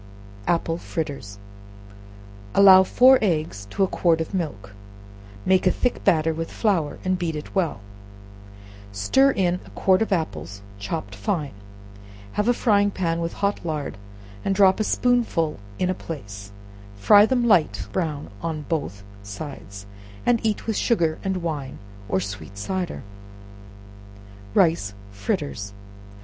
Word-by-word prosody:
Apple 165 -1 0
Fritters. 140 -14 -5 1.2
Allow 190 -1 +9
four 255 +7 +6
eggs 155 - -1
to 195 - 0
a - - +3
quart 170 -3 +2
of 160 +4 -4
milk; 100 - -4 0.7
make 185 0 +3
a - - +5
thick 250 +5 -1
batter 160 -4 +3
with 165 +1 -4
flour, 185 -9 0
and 185 -1 +1
beat 165 -3 -2
it 150 - -7
well; 170 - 0 1.1
stir 105 - +3
in 180 -7 +1
a - - -15
quart 190 0 +3
of 220 - 0
apples, 100 - -3 0.2
chopped 100 0 -4
fine: 135 - -2 0.8
have 210 - -1
a 245 - +5
frying 205 -4 +3
pan 170 -4 -1
with 165 0 -3
hot 200 - -1
lard, 155 -4 -3 0.5
and 195 - 0
drop 190 0 +5
a - - +2
spoonful 225 - +1 0.2
in 180 - 0
a 185 - +1
place; 100 - -8 0.4
fry 205 - +6
them 250 -1 +1
light 190 -9 +2
brown 155 - -3
on 160 -2 -3
both 100 - -3 0.2
sides, 100 -2 -8 0.4
and 240 -2 +2
eat 215 -2 -1
with 220 - -1
sugar 165 -9 +1
and 190 -2 -2
wine, 150 -5 -4 0.3
or 95 - +1
sweet 100 +1 -7
cider. 180 - -3 1.5
Rice 160 - +2 0.2
Fritters. 105 - -3
165 Hz, 135 wpm, -23 LUFS, 135-195 Hz, 1.5 s, Allow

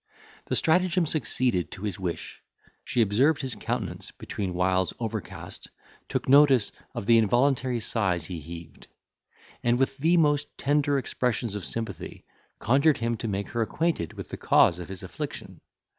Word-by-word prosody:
The - - -1
stratagem 180 +1 +3
succeeded 125 - 0
to 95 - -9
his 100 -3 -3
wish. 90 -3 -5 0.4
She 120 - +2
observed 135 +10 +2
his 130 -3 -2
countenance - - -4
between 95 -3 -5
whiles 90 0 +1
overcast, 115 -2 -6 0.4
took - - -2
notice 135 -4 +6 0.2
of - - -4
the 115 +1 +6
involuntary 125 +2 +2
sighs 95 -7 0
he 85 -1 -5
heaved; 85 +1 -10 0.7
and, 120 0 +2
with 135 +1 0
the 165 +5 +3
most 145 -2 +3
tender 145 0 +2
expressions 120 -4 -1
of 105 -2 -3
sympathy, 115 -3 -5 0.3
conjured 140 +6 +3
him 115 0 -1
to 115 - -4
make 100 -1 -3
her 120 - -2
acquainted 150 - -1
with - - -8
the - - -6
cause 85 - +4
of 90 - -7
his 95 -2 -7
affliction. - - -7
115 Hz, 155 wpm, -27 LUFS, 95-140 Hz, 0.7 s, notice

